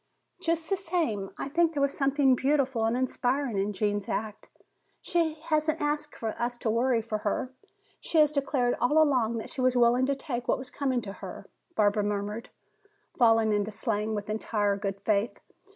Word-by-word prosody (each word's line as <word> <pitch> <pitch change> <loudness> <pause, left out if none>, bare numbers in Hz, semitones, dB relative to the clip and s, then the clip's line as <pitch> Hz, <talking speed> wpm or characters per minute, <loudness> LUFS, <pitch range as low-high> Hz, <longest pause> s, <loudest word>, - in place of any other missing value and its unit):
"Just 330 0 0
the 390 - +1
same, 325 - -1
I - - -4
think 330 +3 +2
there 285 - -1
was 280 - 0
something 275 -1 +3
beautiful 265 -3 +1
and 225 +2 +1
inspiring 255 -2 0
in 200 +2 0
Gene's 205 0 -1
act. 215 -1 -4 0.5
She 330 -3 0
hasn't 310 0 +1
asked 295 0 -2
us 240 +2 -2
to 235 -3 -1
worry 240 +2 +2
over 220 -1 -2
her. 220 +5 -2 0.5
She 330 - -2
has 300 -1 +6
declared 275 -4 +1
all 295 +6 +4
along 250 -7 +3
that 220 - -6
she 260 - -4
was 255 0 +3
willing 245 +2 +4
to 280 - +1
take 245 -3 -5
what - - +2
was 260 0 -8
coming 265 -3 0
to 195 -3 -7
her," - - -9 0.3
Barbara 210 0 +3
murmured, 205 +2 -3 0.7
falling 225 -2 +5
into 205 0 0
slang 215 0 -2
with 205 0 -4
entire 210 -1 0
good 200 -1 -4
faith. 210 +1 0
245 Hz, 180 wpm, -28 LUFS, 215-280 Hz, 0.7 s, has